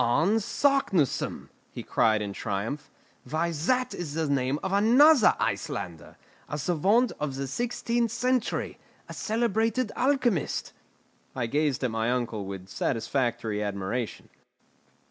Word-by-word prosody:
"Arne 165 - +3
Saknussemm!" 215 - +1 0.2
he - - -7
cried 110 -1 +2
in 100 -1 -4
triumph. 105 +9 -4 0.4
"Why 165 +2 0
that 250 - 0
is 155 -4 -5
the 160 -1 0
name 135 0 +1
of 190 0 -2
another 245 +6 +6
Icelander, 80 -4 -3 0.3
a 150 - -3
savant 195 - +2
of 150 -3 -2
the 135 0 -3
sixteenth 235 - -1
century, 245 +2 -1 0.3
a - - -8
celebrated 225 +1 0
alchemist!" 250 - 0 0.6
I 125 - -1
gazed 145 +2 0
at 125 - 0
my 115 +1 0
uncle 115 -4 -1
with 95 -1 -7
satisfactory 115 0 -1
admiration. 105 +3 -3
150 Hz, 125 wpm, -27 LUFS, -, 0.6 s, another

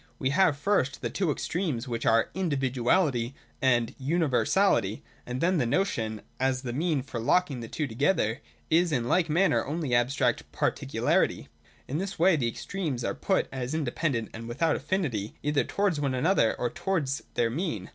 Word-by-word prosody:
We 130 0 0
have 160 -2 +3
first 145 -5 0
the - - -2
two 190 -4 0
extremes, 150 -5 -2
which 115 -1 -3
are 115 0 +3
Individuality 135 -4 +1 0.3
and 120 -3 +2
Universality; 145 - +2 0.2
and 125 +1 -3
then 180 0 +2
the 125 - +1
notion, 115 - -1 0.2
as 130 0 0
the 120 -2 -4
mean 155 -1 0
for 130 -3 -5
locking 140 +3 +2
the 115 - -6
two 150 - -2
together, 135 - 0 0.3
is 170 +1 +4
in 120 -5 0
like 170 +4 +2
manner 180 +5 +3
only 150 -2 -3
abstract 120 0 +1
Particularity. - - 0 0.4
In 145 +5 -2
this 195 0 -4
way 180 +2 +5
the 130 -6 0
extremes 145 - -3
are - - -1
put 190 - 0
as 130 +2 -3
independent 145 -6 -1
and 115 +1 -7
without 150 +7 +1
affinity 120 - -2
either 150 0 +2
towards 200 -6 0
one 135 -2 0
another 130 - +2
or 120 - -1
towards 165 -6 -1
their 115 -1 +1
mean. 130 - -3
140 Hz, 165 wpm, -28 LUFS, 120-170 Hz, 0.4 s, way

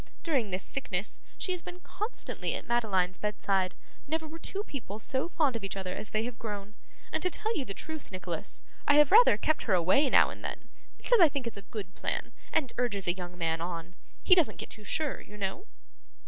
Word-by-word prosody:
During 270 -10 +1
this 185 0 -2
sickness, 205 -7 -3 0.2
she 370 - 0
has 360 -1 -2
been 360 +1 -9
constantly 385 +6 -2
at - - -4
Madeline's 195 -6 +1
bedside 195 -3 0 0.3
never 320 +1 -1
were 325 +2 -9
two 395 +5 -2
people 245 - -6
so 260 +8 0
fond 300 -8 +2
of 225 - -3
each 195 0 -2
other 185 -1 -3
as 210 - -4
they 215 0 0
have 240 0 -5
grown 210 -2 -5 0.4
and - - -1
to 365 - +2
tell 440 +5 -1
you 275 - -1
the 195 -4 -5
truth, 315 -6 -7
Nicholas, 180 -3 -5 0.2
I 290 - +6
have 295 -1 +6
rather 465 +5 +8
kept 310 - +1
her 205 - +4
away 185 - +4
now - - +6
and - - -10
then, - - -5 0.3
because 485 -2 +3
I 330 - +9
think 275 -2 -3
it's 230 - -4
a 200 - -7
good 195 -4 -6
plan, - - -2 0.2
and 285 -7 +1
urges 205 -7 0
a 175 - +4
young 180 -1 -7
man 165 -1 0
on. 170 0 -4 0.3
He 370 - +6
doesn't 345 -5 +4
get - - -7
too 215 - -11
sure, 300 +6 -1
you 210 - -12
know. 200 - -3
230 Hz, 220 wpm, -30 LUFS, 190-315 Hz, 0.4 s, I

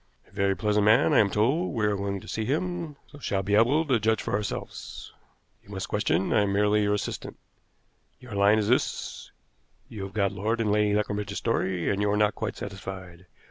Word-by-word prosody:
"A - - -24
very 100 -1 +1
pleasant 105 0 +1
man, 110 +1 +5
I - - +6
am 100 - +4
told. 135 - +1
We 110 -2 +1
are 105 -1 +1
going 100 -1 -3
to - - -13
see 110 - -3
him, 165 +4 -2 0.2
so 145 - -12
shall 100 -7 -1
be 100 +2 -2
able 125 +10 +4
to 130 -6 +2
judge 110 0 +1
for - - -4
ourselves. 100 0 -5 0.5
You - - -23
must 95 -2 -5
question; 95 -3 +1
I 110 - +4
am 100 -1 0
merely 105 +1 +3
your 105 0 +2
assistant. 105 - -5 0.8
Your 125 -3 -11
line 100 +2 +4
is 105 -2 0
this: 125 +3 -1 0.6
You 105 - -7
have 95 - -10
got 100 -3 +1
Lord 105 +4 -1
and 110 -2 +1
Lady 105 0 +2
Leconbridge's 105 -1 -2
story, 95 -6 -1
and 100 0 -1
you 105 - +2
are 105 - +1
not 105 0 +3
quite 110 -3 -4
satisfied. 95 -3 -8
105 Hz, 210 wpm, -27 LUFS, 100-110 Hz, 0.8 s, I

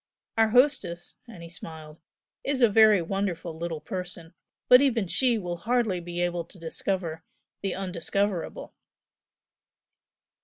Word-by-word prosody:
Our 225 -1 +4
hostess," 220 -9 +2
and 190 -8 -11
he 170 - -9
smiled 160 -1 -10 0.4
"is 270 -2 0
a 235 - +7
very 215 -3 +6
wonderful 175 -2 -3
little 165 -1 -4
person, 180 -2 -6 0.3
but 250 +1 +8
even 240 -7 +2
she 240 +6 +2
will 175 -4 -4
hardly 225 -1 0
be 175 0 -5
able 175 -1 0
to 190 - -17
discover 165 -1 -3 0.4
the 195 - -2
undiscoverable!" 190 0 -2
180 Hz, 125 wpm, -27 LUFS, 170-220 Hz, 0.4 s, but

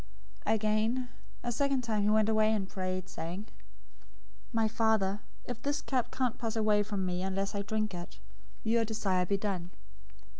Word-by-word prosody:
026:042 220 - +5
Again, 220 +4 +1 0.3
a 240 - -1
second 275 +2 +2
time 220 -3 +1
he 205 - +3
went 215 0 +4
away, 215 0 +4
and 205 -3 0
prayed, 185 -1 -3
saying, 175 +6 -5 1.1
"My 225 -2 +3
Father, 215 -3 +2 0.3
if 245 -2 -5
this 285 +1 -1
cup 255 -3 0
can't 255 -3 -1
pass 225 -1 -2
away 215 -2 +4
from 205 -2 -1
me 180 0 -1
unless 195 +2 -1
I 200 - -1
drink 215 0 -1
it, 175 0 -7 0.5
your 230 0 +3
desire 200 -5 +1
be 200 - +2
done." 190 -4 -2
215 Hz, 165 wpm, -32 LUFS, 195-225 Hz, 1.1 s, 026:042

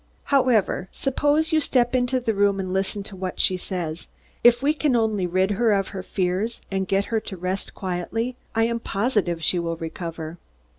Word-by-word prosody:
However, 245 -9 +2
suppose 290 +4 +1
you 315 -1 +3
step 245 -4 +2
into 255 0 +2
the 230 -3 0
room 200 -1 +2
and 185 -1 -3
listen 195 +1 -1
to 195 - -8
what 185 -1 -5
she 185 - +4
says. 175 -3 -4 0.4
If 240 +2 +6
we 295 +2 +4
can 295 -4 +1
only 215 -5 +1
rid 185 +3 +1
her 225 +2 +2
of 195 -1 +1
her 195 - -5
fears 190 +4 -1
and 190 -1 -1
get 195 +2 +1
her 220 - +3
to 210 -3 -7
rest 185 +2 -3
quietly, 195 +7 -2 0.2
I 225 - +3
am 235 0 0
positive 200 -7 0
she 175 +4 +3
will 165 -1 -2
recover." 165 0 -6
200 Hz, 190 wpm, -24 LUFS, 185-240 Hz, 0.4 s, If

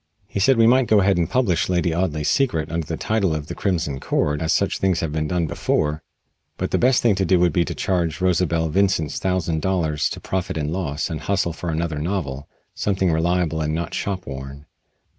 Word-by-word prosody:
He - - -4
said 125 +6 +4
we 115 - +5
might 125 +1 +4
go 105 -1 +5
ahead 95 -1 +3
and 85 - 0
publish 110 -11 +1
"Lady 90 -2 +1
Audley's 80 -4 -1
Secret" 100 - +1
under 80 -2 -2
the - - -3
title 100 -7 0
of 75 -1 -4
"The - - -6
Crimson 80 -8 -1
Cord," 75 +2 0
as 80 0 0
such - - +1
things 95 -3 +1
had 80 - -2
been 75 0 -1
done 85 +1 0
before, 75 0 -1 0.6
but - - -3
the - - +2
best 125 0 +3
thing 115 -3 +4
to 95 0 0
do 90 0 +3
would 85 -3 +3
be 85 - +3
to - - -5
charge 85 -4 -1
Rosa 90 -1 +2
Belle 80 0 0
Vincent's 95 -4 +1
thousand 85 -4 -1
dollars 80 -5 0
to - - -6
Profit 95 -3 -3
and 75 +1 -2
Loss 80 -4 -2
and 80 - -4
hustle 95 -4 0
for 85 +1 -5
another 80 -1 -2
novel 75 -5 -3 0.3
something 95 -3 0
reliable 80 0 +1
and 75 0 -1
not 85 0 -3
shop 95 -3 -3
worn. 70 +1 -8
85 Hz, 215 wpm, -22 LUFS, 80-95 Hz, 0.6 s, we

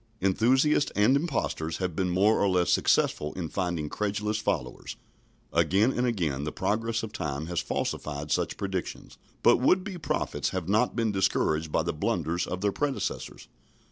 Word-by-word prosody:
Enthusiasts 130 +10 +3
and 105 +6 +4
impostors 135 - -1
have 90 -4 -3
been 95 0 0
more 100 +5 +3
or 100 - +3
less 90 -1 +2
successful 75 0 +2
in 85 -4 -4
finding 85 -5 -2
credulous 105 +4 -2
followers. 65 -12 -3 0.6
Again 105 +7 +3
and 125 -1 0
again 80 - -1
the 75 - -3
progress 115 +2 -1
of 110 -1 -6
time 70 -4 -3
has 85 0 -2
falsified 75 0 -3
such - - 0
predictions, 95 -2 -5 0.2
but - - +6
would 185 +9 +3
be 190 -3 -6
prophets - - -1
have 95 -3 -4
not 110 +5 +2
been 115 -2 +1
discouraged 80 -5 +1
by - - +1
the - - -2
blunders 85 +2 -1
of 90 0 -4
their 100 0 +2
predecessors. 145 +5 -3
100 Hz, 165 wpm, -28 LUFS, 85-115 Hz, 0.6 s, but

